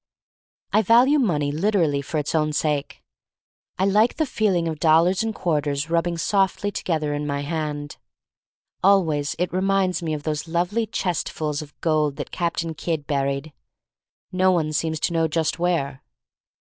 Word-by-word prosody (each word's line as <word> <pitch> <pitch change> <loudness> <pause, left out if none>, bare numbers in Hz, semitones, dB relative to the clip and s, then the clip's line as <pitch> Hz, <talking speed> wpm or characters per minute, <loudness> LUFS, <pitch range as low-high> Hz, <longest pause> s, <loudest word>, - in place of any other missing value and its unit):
I 215 - +5
value 245 +8 +5
money 150 - +1
literally 160 -4 +1
for 155 +3 -4
its 150 -1 -2
own 155 -1 +1
sake. 150 -1 -2 0.7
I 190 - +1
like 210 +4 +3
the 315 - +1
feeling 195 - 0
of 160 -2 -4
dollars 165 +4 +4
and 220 -1 -2
quarters 150 -2 -1
rubbing 170 0 +1
softly 195 +3 +1
together 155 -6 -2
in 145 0 -3
my 140 0 -2
hand. 150 -1 -4 0.9
Always 160 -7 +3
it 180 +1 -2
reminds 190 -1 +1
me 160 -2 -2
of 145 - -7
those 150 0 -3
lovely 180 +7 0
chestfuls 155 -5 -2
of 145 -1 -13
gold 155 -3 +1
that - - -6
Captain 170 -1 -2
Kidd 155 -1 -3
buried 140 +1 -2 0.4
— - - -65
no 185 0 +5
one 155 -4 0
seems 160 +1 -1
to 170 - 0
know 165 -1 +2
just 160 +1 -1
where. 150 -6 -1
165 Hz, 155 wpm, -23 LUFS, 150-185 Hz, 0.9 s, I